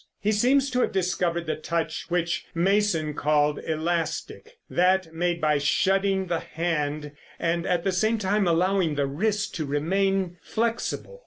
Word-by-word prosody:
He 210 - +1
seems 260 +6 +3
to 250 0 +1
have - - +1
discovered 180 -2 0
the 155 - -1
touch 165 0 -3
which 175 -1 -1
Mason 175 -4 +1
called 150 0 +1
elastic; 170 - -3
that 180 -1 +2
made 175 +1 0
by 150 -2 +2
shutting 190 +6 +2
the 170 -2 -1
hand 150 -3 -2 0.3
and 170 +1 -1
at 175 -2 +1
the 195 - +1
same 220 +5 +1 0.3
allowing 175 -1 +2
the 145 -1 +1
wrist 205 +9 -1
to 155 - -2
remain 185 +5 0
flexible. 235 - -2
175 Hz, 145 wpm, -25 LUFS, 160-195 Hz, 0.3 s, seems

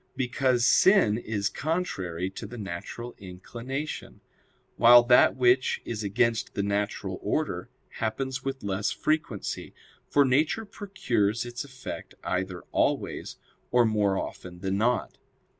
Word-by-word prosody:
Because 125 -2 +1
sin 180 - +5
is 105 -4 -2
contrary 95 - -2
to 105 - -7
the 120 +3 -9
natural 105 +5 -6
inclination; 120 +10 -6 0.5
while 120 +1 +8
that 125 +1 +5
which 125 0 +3
is 110 -2 -4
against 115 +3 0
the 100 - 0
natural 100 0 -2
order - - -2 0.3
happens 130 +4 -2
with 135 0 -4
less 100 0 -1
frequency; 155 - -2 0.3
for 145 -1 +4
nature 150 - +2
procures 120 - -1
its 120 +1 -5
effects 130 -3 -8
either 90 -1 -2
always, - - -1 0.3
or 120 -1 +4
more 105 -3 +2
often 90 -2 -6
than 95 0 -1
not. 115 +3 0
120 Hz, 125 wpm, -27 LUFS, 100-130 Hz, 0.5 s, while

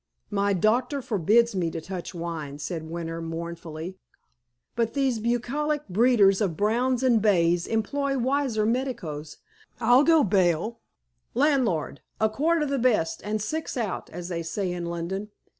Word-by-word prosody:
"My 200 0 +1
doctor 245 - +1
forbids 230 - +2
me 175 -3 0
to 165 - -5
touch 180 +2 -6
wine," 165 -4 -5
said 160 +1 -5
Winter 165 0 -4
mournfully. 165 +1 -6 0.8
"But 230 +1 0
these 265 -5 +1
bucolic 275 +6 -1
breeders 205 -1 +4
of 180 -6 0
browns 240 +4 +1
and 240 -4 +4
bays 175 -4 +3
employ 275 +5 0
wiser 255 -4 +1
medicos, 215 - -3 0.4
I'll 245 +3 +5
go 325 -1 +5
bail. 190 +2 +1 0.6
Landlord, 245 - +1 0.2
a 220 - +3
quart 315 +7 +1
of 295 - -2
the 275 -1 0
best, 220 -10 +1
and 215 +1 -2
six 310 +6 -3
out, 220 -6 -3
as 175 +1 -7
they 170 -2 -2
say 180 +3 -2
in 175 -1 -4
London." 175 +5 -4
210 Hz, 145 wpm, -26 LUFS, 170-250 Hz, 0.8 s, I'll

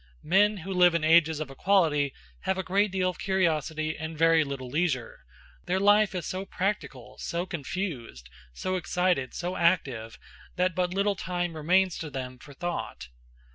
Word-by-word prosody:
Men 205 +5 +3
who 190 +2 -5
live 180 -2 +5
in 165 - 0
ages 160 -1 +4
of 150 -3 -5
equality 150 -3 +2 0.3
have 190 0 -1
a 190 - -2
great 200 +3 +2
deal 185 -1 +1
of - - -16
curiosity 160 -4 0
and 160 +1 -6
very 165 0 +5
little 140 -3 -5
leisure; 140 -3 -1 0.5
their 185 +2 +1
life 205 0 +4
is 175 -3 -3
so 185 +1 -3
practical, 195 +1 -4
so 170 +1 -3
confused, 150 - -5 0.2
so 185 - -2
excited, 180 -6 0
so 180 +1 -3
active, 135 -10 0 0.4
that 180 0 +1
but 180 0 0
little 200 +2 +1
time 175 -3 -3
remains 180 +4 +2
to 160 - -5
them 130 -2 -6
for 140 0 -13
thought. 175 - -5
175 Hz, 165 wpm, -27 LUFS, 150-185 Hz, 0.5 s, live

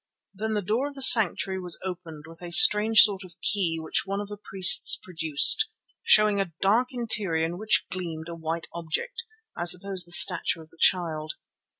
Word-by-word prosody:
Then 220 +2 -6
the 205 - -4
door 225 +9 -3
of 290 - -12
the 270 - -3
sanctuary 195 -5 +4
was 180 -2 0
opened 170 -5 -10
with 165 +1 -15
a 175 - -10
strange 210 +5 +5
sort 200 -2 -2
of 180 -1 -17
key 180 -6 -2
which 160 - -3
one 195 +1 -6
of 205 0 -8
the 205 - -10
priests 190 -2 +3
produced, 165 - +3 0.3
showing 210 -2 +2
a 175 -4 -7
dark 220 +6 0
interior 210 -9 -2
in 175 +2 -8
which 215 +1 -1
gleamed 170 -3 -8
a 170 - -9
white 165 0 -7
object, 170 - -7 0.3
I 175 - -6
suppose 180 +1 -2
the 175 - -11
statue 175 -1 +4
of 160 - -18
the 165 - -19
Child. 160 -4 -1
185 Hz, 190 wpm, -23 LUFS, 165-210 Hz, 0.3 s, strange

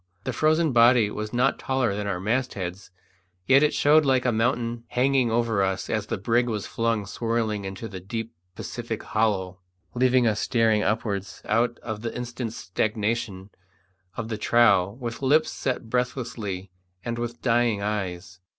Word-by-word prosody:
The 130 - -3
frozen 155 +4 +2
body 120 -3 +5
was 105 0 -5
not 125 +3 +1
taller 130 -5 0
than 105 0 -3
our 95 -3 -2
mastheads, 100 -4 -2 0.6
yet 135 +1 +6
it 150 0 +4
showed 155 +2 +4
like 130 -3 +2
a 125 - +3
mountain 115 0 0
hanging 130 0 +2
over 115 -3 +1
us 95 0 -1
as 110 -2 -1
the - - -2
brig 120 +4 +1
was 105 -3 -3
flung 115 -3 -1
swirling 110 0 -2
into 95 +4 -6
the 95 -3 -7
deep 115 +5 -5 0.2
Pacific - - -5
hollow, 100 -4 0 0.3
leaving 125 0 +3
us 110 -2 +1
staring 115 -3 +2
upwards 105 -3 -2
out 115 +2 +1
of 110 -2 -5
the 115 0 -4
instant's 120 -1 -5
stagnation 105 -1 -2 0.7
of 115 - -3
the 110 -2 -4
trough 100 -5 +4
with 120 -2 -5
lips 150 +4 +3
set 125 -3 -3
breathlessly 115 -6 -3 0.3
and 120 0 -3
with 120 0 -4
dying 115 -4 +2
eyes. 95 -3 -4
115 Hz, 160 wpm, -25 LUFS, 105-120 Hz, 0.7 s, yet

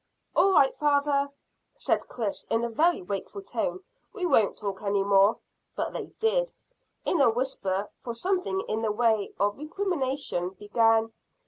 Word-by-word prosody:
"All 390 - +5
right, 270 -6 +5
father," 285 -1 +2 0.5
said - - 0
Chris, 220 -5 -4
in 225 +1 +1
a 235 - -1
very 330 - +2
wakeful 200 - -5
tone; 375 - -3 0.3
"we 390 -5 -3
won't 225 - +3
talk 200 -2 -4
any 200 -1 +1
more." 200 +1 +4 0.4
But - - -2
they - - -4
did, - - +1 0.5
in 340 - +2
a 260 - +6
whisper, 215 -5 -1
for 235 -1 -5
something 375 +6 -1
in 220 - -3
the 220 -2 0
way 220 -2 +1
of 205 +4 +1
recrimination 285 - -2
began. 225 +1 +2
235 Hz, 150 wpm, -27 LUFS, 205-310 Hz, 0.5 s, a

